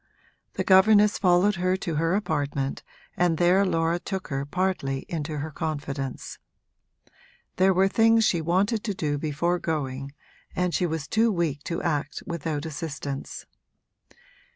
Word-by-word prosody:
The - - -2
governess 205 +2 +5
followed 185 +1 +3
her 185 +1 +1
to 175 -3 -4
her 165 +4 +1
apartment 145 -8 -2 0.3
and 175 -2 +2
there 180 +3 +4
Laura 165 -2 +1
took 190 -1 -5
her 140 0 -3
partly 145 -6 -1
into 155 -2 -4
her 150 +2 -4
confidence. 140 -3 -5 1.2
There 190 +1 +5
were 190 +1 +3
things 225 +2 +4
she 170 -5 +2
wanted 195 +7 +1
to 205 -4 -2
do 145 -4 -1
before 160 +4 -1
going, 140 -4 -3 0.4
and 180 -1 0
she 180 - +1
was 160 -3 -4
too 225 +1 +2
weak 160 -6 -1
to 170 - -3
act 150 -3 -2
without 160 -3 -3
assistance. 145 -2 -6
165 Hz, 140 wpm, -26 LUFS, 145-185 Hz, 1.2 s, governess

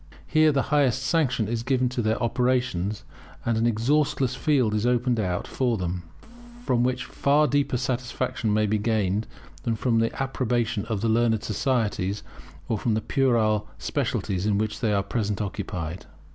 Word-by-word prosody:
Here 155 0 +4
the 140 -2 +1
highest 135 -3 +3
sanction 130 -6 +1
is 115 0 -2
given 130 0 +1
to 125 -1 -2
their 110 0 +1
operations, 120 -5 0 0.4
and 115 - +1
an 115 +1 +2
exhaustless 130 +3 +1
field 130 -5 +2
is 105 0 0
opened 120 -1 +1
out 90 -4 -1
for 125 -3 0
them, 90 -1 -3 0.6
from 120 -1 +2
which 125 0 0
far 145 +4 +2
deeper 145 -2 +1
satisfaction 125 -2 -2
may 105 +1 +3
be 105 +1 +1
gained 105 -1 0 0.3
than 115 - -1
from 115 0 +1
the 115 0 +1
approbation 120 -5 -1
of 110 -3 -2
the 115 - +1
learned 110 -1 +2
societies, 105 -4 -1 0.4
or 110 - -1
from 115 0 +1
the 110 - 0
puerile 110 -7 +2
specialities 95 -1 -2
with 105 - +2
which 110 +1 -1
they 110 - +1
are 100 -1 +2
at - - -23
present 105 -4 -1
occupied. 90 -4 -4
115 Hz, 170 wpm, -25 LUFS, 105-125 Hz, 0.6 s, Here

